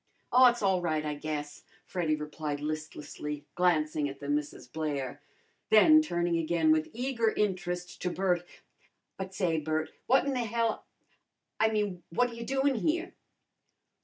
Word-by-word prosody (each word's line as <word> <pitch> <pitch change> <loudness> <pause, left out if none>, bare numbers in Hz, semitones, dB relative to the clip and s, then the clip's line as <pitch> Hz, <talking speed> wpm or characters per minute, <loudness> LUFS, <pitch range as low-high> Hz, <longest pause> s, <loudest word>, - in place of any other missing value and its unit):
"Aw, 255 0 +8
it's 240 -2 -3
all 190 -2 +3
right, 155 -3 -1
I 150 - -1
guess," 150 0 -5 0.2
Freddy 165 -4 0
replied 150 -1 -4
listlessly, 150 -1 -5
glancing 155 -4 +1
at 135 0 -9
the 140 - -7
Misses 150 -2 -2
Blair. 145 -1 -3 0.5
Then 310 +9 +7
turning 175 - 0
again 165 -1 +2
with 155 0 +2
eager 235 -2 0
interest 180 -3 -2
to 180 - 0
Bert, 180 -1 0 0.7
"But 190 0 -6
say, 170 -4 +1
Bert, 155 +1 -2 0.2
what 265 +2 +4
in 280 - 0
the 255 - -1
hell 230 0 -1 0.7
a - - +5
I - - +4
mean 205 -5 -1
what 245 +9 +2
ta - - -10
you 230 0 -6
doin' 270 +1 +2
here?" 340 - -1
175 Hz, 160 wpm, -30 LUFS, 155-220 Hz, 0.7 s, Aw